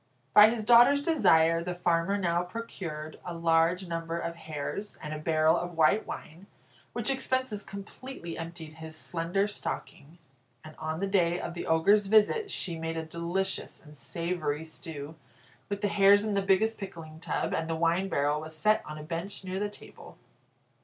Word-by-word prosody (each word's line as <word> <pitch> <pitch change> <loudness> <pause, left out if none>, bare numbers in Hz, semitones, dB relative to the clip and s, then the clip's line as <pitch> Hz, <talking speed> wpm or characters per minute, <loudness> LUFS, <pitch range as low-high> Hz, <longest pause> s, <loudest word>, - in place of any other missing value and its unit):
By 210 +1 +9
his 225 -1 -2
daughter's 245 +5 +6
desire 165 - +4
the 180 0 -4
farmer 175 +2 +1
now 175 -3 +1
procured 175 -6 -6
a 175 - -6
large 165 +2 +2
number 165 0 -3
of 170 0 -3
hares, 160 +5 -5
and 150 -1 -6
a 155 - -5
barrel 155 +1 +3
of 175 -1 -4
white 165 +7 +3
wine, 170 +6 -8 0.5
which 240 +2 0
expenses 260 -5 -1
completely 200 -1 -8
emptied 165 -1 -8
his 160 0 -8
slender 175 +5 -1
stocking, 170 -5 -6 0.5
and 155 0 -11
on 155 0 -3
the 195 - -1
day 180 -3 +2
of 170 - -5
the 170 - -6
Ogre's 195 +6 +4
visit, 220 - +4
she 170 - -2
made 165 0 -3
a 160 - -3
delicious 170 +4 -3
and 150 -1 -15
savoury 160 -1 -3
stew 160 -2 -7 0.6
with 200 0 -3
the 205 - +2
hares 200 +1 +5
in 215 - -1
the 200 - +2
biggest 200 +3 +2
pickling 165 -5 -8
tub, - - -2
and 160 0 -2
the 165 - 0
wine 170 +4 +1
barrel 145 0 +1
was 155 0 -5
set 215 +7 +3
on 150 - -7
a 150 - -8
bench 170 +6 -4
near 185 0 -3
the 205 0 -1
table. 205 - -13
170 Hz, 175 wpm, -29 LUFS, 160-200 Hz, 0.6 s, By